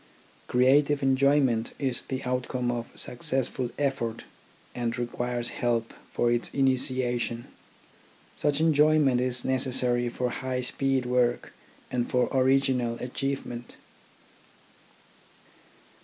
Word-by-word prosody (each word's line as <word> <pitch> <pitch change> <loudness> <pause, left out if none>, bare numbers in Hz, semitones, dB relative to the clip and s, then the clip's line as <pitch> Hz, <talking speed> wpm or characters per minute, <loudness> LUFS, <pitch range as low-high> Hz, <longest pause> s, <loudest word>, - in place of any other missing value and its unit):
Creative 140 +3 +3
enjoyment 135 -3 +2
is 130 -4 -1
the 130 0 -5
outcome 125 -1 -1
of 120 -1 -4
successful 125 0 -2
effort 135 -5 -2 0.5
and 120 -1 -2
requires 120 0 -2
help 115 -2 -1 0.2
for 120 - +1
its 120 0 0
initiation. 130 -3 +1 0.9
Such 145 0 0
enjoyment 150 -4 +4
is 125 -1 0
necessary 125 -2 +1
for 125 +1 -2
high 130 0 -3
speed 135 0 -1
work 125 -1 0 0.4
and 120 -1 -1
for 125 0 +1
original 130 -2 +2
achievement. 125 -1 -4
125 Hz, 95 wpm, -27 LUFS, 120-135 Hz, 0.9 s, enjoyment